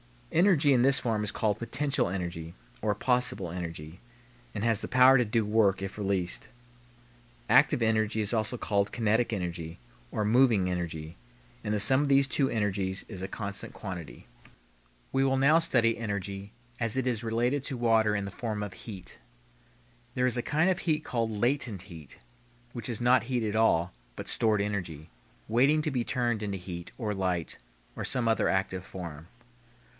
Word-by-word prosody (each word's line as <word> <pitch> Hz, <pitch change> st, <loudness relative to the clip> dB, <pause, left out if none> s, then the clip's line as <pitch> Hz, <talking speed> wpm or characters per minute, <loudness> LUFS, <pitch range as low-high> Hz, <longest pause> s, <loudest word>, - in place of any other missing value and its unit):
Energy 170 Hz, -5 st, +4 dB
in 125 Hz, -3 st, +4 dB
this 135 Hz, +1 st, +5 dB
form 115 Hz, -4 st, 0 dB
is 105 Hz, -, -2 dB
called 105 Hz, -1 st, 0 dB
potential 140 Hz, +4 st, 0 dB, 0.9 s
(possible) 125 Hz, -8 st, 0 dB
energy, 85 Hz, -1 st, -6 dB, 0.6 s
and 105 Hz, -, -3 dB
has 115 Hz, -3 st, +2 dB
the -, -, -4 dB
power 130 Hz, +1 st, +6 dB
to 125 Hz, -, +2 dB
do 110 Hz, 0 st, 0 dB
work 105 Hz, -3 st, +2 dB
if 95 Hz, +1 st, -5 dB
released. 95 Hz, -3 st, -1 dB, 1.0 s
Active 120 Hz, -, +5 dB
energy 110 Hz, 0 st, +1 dB
is 105 Hz, +2 st, -3 dB, 0.3 s
called 100 Hz, -1 st, +1 dB
kinetic 115 Hz, +1 st, +1 dB, 0.8 s
(moving) 110 Hz, -3 st, +3 dB
energy, 80 Hz, -2 st, -4 dB, 0.5 s
and 105 Hz, -1 st, -1 dB
the 105 Hz, -, +1 dB
sum 130 Hz, +7 st, +4 dB
of 145 Hz, -, 0 dB
these 140 Hz, 0 st, +4 dB
two 135 Hz, 0 st, +1 dB
energies 100 Hz, -3 st, -1 dB
is 95 Hz, -5 st, -7 dB
a 95 Hz, -, -3 dB
constant 100 Hz, -1 st, -5 dB
quantity. 90 Hz, -, -8 dB, 0.9 s
We 135 Hz, 0 st, +2 dB
will 135 Hz, 0 st, +2 dB
now 145 Hz, +5 st, +5 dB
study 120 Hz, -8 st, +2 dB
energy 100 Hz, -2 st, -4 dB, 0.3 s
as 115 Hz, -1 st, 0 dB
it 130 Hz, -, 0 dB
is 120 Hz, -3 st, -1 dB
related 120 Hz, +5 st, 0 dB
to 135 Hz, -, -2 dB
water 110 Hz, -3 st, +3 dB
in 100 Hz, -1 st, -1 dB
the 100 Hz, -, -6 dB
form 105 Hz, -1 st, -3 dB
of 100 Hz, -2 st, -6 dB
heat. 100 Hz, -5 st, -9 dB, 1.0 s
There 125 Hz, -, +2 dB
is 125 Hz, -1 st, +1 dB
a -, -, +1 dB
kind 155 Hz, +8 st, +1 dB
of 180 Hz, -, -1 dB
heat 155 Hz, -4 st, 0 dB
called 115 Hz, -2 st, -1 dB
"latent 110 Hz, -2 st, 0 dB
heat," 80 Hz, -8 st, -10 dB, 0.5 s
which 120 Hz, -1 st, -6 dB
is 120 Hz, -1 st, -2 dB
not 125 Hz, +1 st, +4 dB
heat 120 Hz, -1 st, -1 dB
at 105 Hz, -1 st, -2 dB
all, 90 Hz, -6 st, +3 dB, 0.2 s
but -, -, -3 dB
stored 110 Hz, -2 st, +2 dB
energy, 90 Hz, -7 st, -4 dB, 0.4 s
waiting 135 Hz, +7 st, +3 dB
to 155 Hz, -, 0 dB
be 125 Hz, -3 st, -1 dB
turned 120 Hz, -4 st, 0 dB
into 100 Hz, -2 st, -3 dB
heat, 85 Hz, -1 st, -7 dB
or 110 Hz, -4 st, -2 dB
light, 90 Hz, -4 st, -2 dB, 0.4 s
or -, -, -3 dB
some 125 Hz, -3 st, +1 dB
other 115 Hz, -, +2 dB
active 95 Hz, -1 st, -1 dB
form. 85 Hz, -4 st, -8 dB
110 Hz, 165 wpm, -29 LUFS, 95-125 Hz, 1.0 s, power